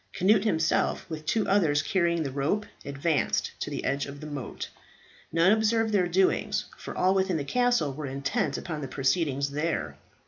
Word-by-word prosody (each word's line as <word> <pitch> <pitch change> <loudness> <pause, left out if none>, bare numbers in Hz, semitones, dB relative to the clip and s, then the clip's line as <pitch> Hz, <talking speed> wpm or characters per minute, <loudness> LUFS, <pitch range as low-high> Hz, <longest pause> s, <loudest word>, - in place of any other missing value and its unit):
Cnut 205 +3 +3
himself, 165 -6 +1
with 155 -1 -6
two 220 -2 +1
others 160 -8 +3
carrying 170 -1 +1
the 135 - -3
rope, 145 +10 0 0.2
advanced 140 +2 0
to - - -3
the - - -4
edge 140 +2 0
of 140 0 -8
the 155 - -8
moat. 145 -4 -5 0.6
None 170 +4 +4
observed 220 +1 +2
their 185 -3 +3
doings, 185 +2 +1
for - - -8
all 185 +1 +3
within 190 -3 +1
the 145 - -2
castle 245 - +1
were 150 +1 -5
intent 140 - -1
upon 160 -4 -5
the 135 - -4
proceedings 140 +1 0
there. 140 - -2
160 Hz, 175 wpm, -27 LUFS, 140-195 Hz, 0.6 s, None